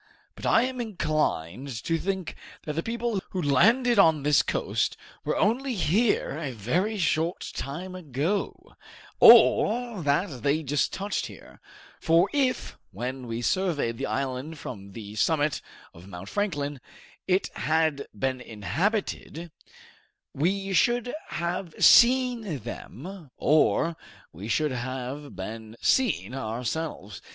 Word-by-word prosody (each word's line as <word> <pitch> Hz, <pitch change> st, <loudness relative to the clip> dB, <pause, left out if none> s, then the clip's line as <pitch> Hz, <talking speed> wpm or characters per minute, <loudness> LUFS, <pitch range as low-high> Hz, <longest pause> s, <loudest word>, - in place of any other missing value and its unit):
But -, -, -5 dB
I 230 Hz, -, +5 dB
am 255 Hz, -1 st, -2 dB
inclined 150 Hz, -, -1 dB, 0.2 s
to 165 Hz, 0 st, 0 dB
think 190 Hz, -2 st, -3 dB, 0.3 s
that 150 Hz, -, -4 dB
the 165 Hz, -, -1 dB
people 230 Hz, -1 st, -2 dB
who 185 Hz, -, -4 dB
landed 220 Hz, -, +4 dB
on 160 Hz, -6 st, +5 dB
this 145 Hz, -1 st, +4 dB
coast -, -, -1 dB, 0.3 s
were -, -, -1 dB
only 250 Hz, +4 st, +1 dB
here 195 Hz, -3 st, +1 dB
a 145 Hz, -6 st, -4 dB
very 175 Hz, -, -1 dB
short 165 Hz, -1 st, 0 dB
time 175 Hz, +7 st, -5 dB
ago, 165 Hz, +3 st, -3 dB, 0.4 s
or 235 Hz, -3 st, +6 dB
that 145 Hz, -, 0 dB
they 145 Hz, +5 st, +1 dB
just 145 Hz, +1 st, 0 dB
touched 200 Hz, +2 st, -3 dB
here; -, -, -14 dB, 0.4 s
for 165 Hz, +3 st, +3 dB
if, 270 Hz, -3 st, 0 dB
when 125 Hz, +6 st, -5 dB
we 115 Hz, +1 st, -4 dB
surveyed 150 Hz, -10 st, 0 dB
the -, -, -2 dB
island 130 Hz, +6 st, -3 dB
from 100 Hz, -8 st, -8 dB
the 105 Hz, -1 st, -8 dB
summit 150 Hz, +5 st, +1 dB, 0.3 s
of 85 Hz, +3 st, -14 dB
Mount 95 Hz, 0 st, -9 dB
Franklin, 145 Hz, -9 st, -2 dB, 0.5 s
it 185 Hz, +1 st, +1 dB
had 155 Hz, 0 st, +1 dB
been 130 Hz, -1 st, -1 dB
inhabited, 165 Hz, -, -3 dB, 0.8 s
we 195 Hz, +6 st, -1 dB
should 240 Hz, +7 st, +2 dB
have 170 Hz, 0 st, -3 dB
seen 240 Hz, -, +5 dB
them 160 Hz, -, -8 dB
or 155 Hz, +2 st, +3 dB, 0.4 s
we 95 Hz, +6 st, -8 dB
should 150 Hz, +5 st, +1 dB
have 130 Hz, +2 st, -5 dB
been 110 Hz, +4 st, -7 dB
seen 240 Hz, -, +1 dB
ourselves. 120 Hz, -, -4 dB
155 Hz, 125 wpm, -26 LUFS, 130-195 Hz, 0.8 s, or